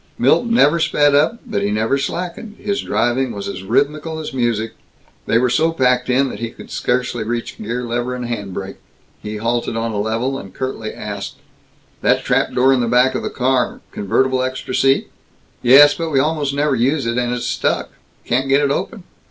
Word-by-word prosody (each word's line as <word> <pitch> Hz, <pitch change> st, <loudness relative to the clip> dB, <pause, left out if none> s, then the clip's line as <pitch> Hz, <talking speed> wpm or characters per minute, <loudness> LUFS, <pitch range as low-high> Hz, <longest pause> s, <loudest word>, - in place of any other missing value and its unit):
Milt 245 Hz, -, +3 dB
never 170 Hz, -9 st, +4 dB
sped 150 Hz, -3 st, +3 dB
up, 155 Hz, +11 st, +3 dB
but 100 Hz, -, -2 dB
he 100 Hz, -, 0 dB
never 110 Hz, +5 st, +1 dB
slackened. 180 Hz, -, -4 dB
His 200 Hz, -1 st, -2 dB
driving 120 Hz, +1 st, 0 dB
was 100 Hz, -1 st, -5 dB
as 90 Hz, -2 st, -5 dB
rhythmical 150 Hz, +10 st, 0 dB
as 155 Hz, -, -6 dB
music. 115 Hz, -3 st, -1 dB, 0.5 s
They 115 Hz, -, +3 dB
were 125 Hz, +2 st, +3 dB
so 160 Hz, +6 st, +2 dB
packed 125 Hz, -5 st, +1 dB
in 135 Hz, +2 st, +2 dB
that 100 Hz, -, -7 dB
he 115 Hz, 0 st, -3 dB
could -, -, -13 dB
scarcely 125 Hz, -2 st, -1 dB
reach 120 Hz, +1 st, -4 dB
gear 115 Hz, +3 st, -3 dB
lever 120 Hz, +1 st, -2 dB
and 125 Hz, -1 st, -5 dB
hand 105 Hz, -5 st, -4 dB
brake. 95 Hz, 0 st, -6 dB, 0.4 s
He 105 Hz, 0 st, -5 dB
halted 115 Hz, +1 st, -1 dB
on 115 Hz, 0 st, -1 dB
a 105 Hz, -, -2 dB
level, 115 Hz, +6 st, -1 dB
and 95 Hz, -, -11 dB
curtly 130 Hz, -4 st, -4 dB
asked, 100 Hz, -2 st, -6 dB, 0.7 s
"That -, -, +2 dB
trap -, -, +1 dB
door 130 Hz, +2 st, +4 dB
in 130 Hz, -, +2 dB
the 120 Hz, -, 0 dB
back 125 Hz, +2 st, +3 dB
of -, -, -2 dB
the -, -, -3 dB
car 130 Hz, 0 st, 0 dB
convertible 130 Hz, +6 st, +1 dB
extra 130 Hz, 0 st, -4 dB
seat?" 135 Hz, +1 st, +2 dB, 0.5 s
"Yes, 140 Hz, +4 st, +8 dB
but 165 Hz, -1 st, -3 dB
we 145 Hz, -, 0 dB
almost 145 Hz, -1 st, 0 dB
never 145 Hz, 0 st, +1 dB
use 135 Hz, +4 st, +1 dB
it, 115 Hz, +1 st, 0 dB
and 120 Hz, 0 st, -1 dB
it's 125 Hz, -1 st, -3 dB
stuck. -, -, -1 dB, 0.3 s
Can't 130 Hz, +3 st, 0 dB
get 135 Hz, +2 st, +4 dB
it 140 Hz, -1 st, +1 dB
open." 200 Hz, +7 st, -3 dB
125 Hz, 200 wpm, -19 LUFS, 115-140 Hz, 0.7 s, Yes